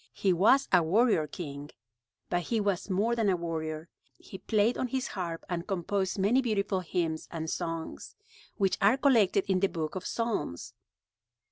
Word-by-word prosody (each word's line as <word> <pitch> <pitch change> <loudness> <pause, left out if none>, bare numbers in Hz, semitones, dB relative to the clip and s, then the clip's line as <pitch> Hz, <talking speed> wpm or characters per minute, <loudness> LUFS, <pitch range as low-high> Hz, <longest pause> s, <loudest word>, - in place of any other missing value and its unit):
He 190 -2 +2
was 225 +10 +4
a 180 - +7
warrior 185 -1 +3
king; 145 -3 -7 0.6
but 175 -1 0
he 225 +5 -1
was 200 -2 -1
more 205 +5 +1
than 225 -3 +1
a 185 - +3
warrior. 160 -1 -4 0.3
He 190 - -11
played 220 +2 +2
on 255 - -1
his 260 +1 -2
harp 170 -4 -5
and 175 -1 -4
composed 190 0 -1
many 210 +7 +3
beautiful 205 -5 0
hymns 165 -3 -2
and 160 -1 -5
songs, 165 0 -5 0.4
which 195 -2 +1
are 210 +6 +5
collected 225 -9 +3
in 190 -1 +2
the 195 +1 +2
book 160 -3 -4
of 185 -1 -5
Psalms. 225 - -3
190 Hz, 165 wpm, -29 LUFS, 165-215 Hz, 0.6 s, a